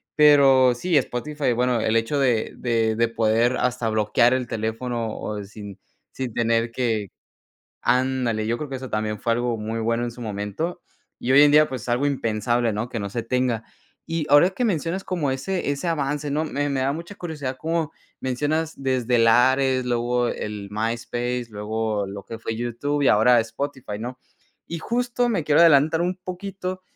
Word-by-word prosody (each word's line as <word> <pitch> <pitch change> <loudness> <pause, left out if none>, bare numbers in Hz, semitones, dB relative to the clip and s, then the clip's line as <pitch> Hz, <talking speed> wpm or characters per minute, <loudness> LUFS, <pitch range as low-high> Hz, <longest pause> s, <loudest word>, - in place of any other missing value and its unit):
Pero 135 -4 +6
sí, 165 +5 +1
Spotify, 145 +2 -1
bueno, 125 0 +1
el 110 +1 +1
hecho 115 +6 +1
de 125 -5 +1
de 115 -2 +1
de 115 0 +2
poder 115 +2 +2
hasta 125 -2 0
bloquear 110 +3 +3
el 125 -2 -1
teléfono 115 +1 -3
o 105 -1 -4
sin 100 -1 -10 0.3
sin 130 -4 -5
tener 115 0 +1
que 115 -6 -1 0.7
ándale, 125 -4 +1
yo 115 - 0
creo 150 - -5
que 135 - -3
eso 130 0 -8
también 110 0 -2
fue 115 - +1
algo 120 0 0
muy 110 +2 -3
bueno 115 +1 0
en 120 - -3
su 120 - -12
momento. 105 - -4 0.4
Y 125 - -3
hoy 140 - +8
en 145 0 +6
día, 155 +1 +6
pues, 125 -3 -6
algo 120 +3 +1
impensable, 120 -3 0
¿no?, 110 +4 -3
que 120 - -4
no 100 - -3
se 115 +2 -3
tenga. 125 -1 -1 0.4
Y 165 -2 -2
ahora 145 +6 +6
que 220 +6 -2
mencionas 185 -2 -1
como 170 -7 -1
ese 145 +5 -2
ese 145 +5 -3
avance, 145 -2 -1
¿no? 150 +3 0
Me 145 -2 -2
me 135 - -1
da 135 +1 +1
mucha 170 +6 -7
curiosidad 150 -7 -5
como 165 -1 -1 0.3
mencionas 150 +5 -1
desde 130 -3 0
el 115 -1 +4
Ares, 130 +2 +3
luego 120 0 0
el 105 -3 -5
MySpace, 120 +3 -2
luego 105 0 -2
lo 100 0 -8
que 115 - -8
fue 115 0 -4
YouTube 120 +5 -2
y 140 - +4
ahora 120 +3 +5
Spotify, 115 -1 -5
¿no? 125 +3 -6 0.5
Y 170 - -5
justo 245 +4 0
me 200 -9 0
quiero 150 +2 +4
adelantar 160 0 +5
un 180 +1 -1
poquito, 185 0 -6
125 Hz, 185 wpm, -23 LUFS, 115-145 Hz, 0.7 s, hoy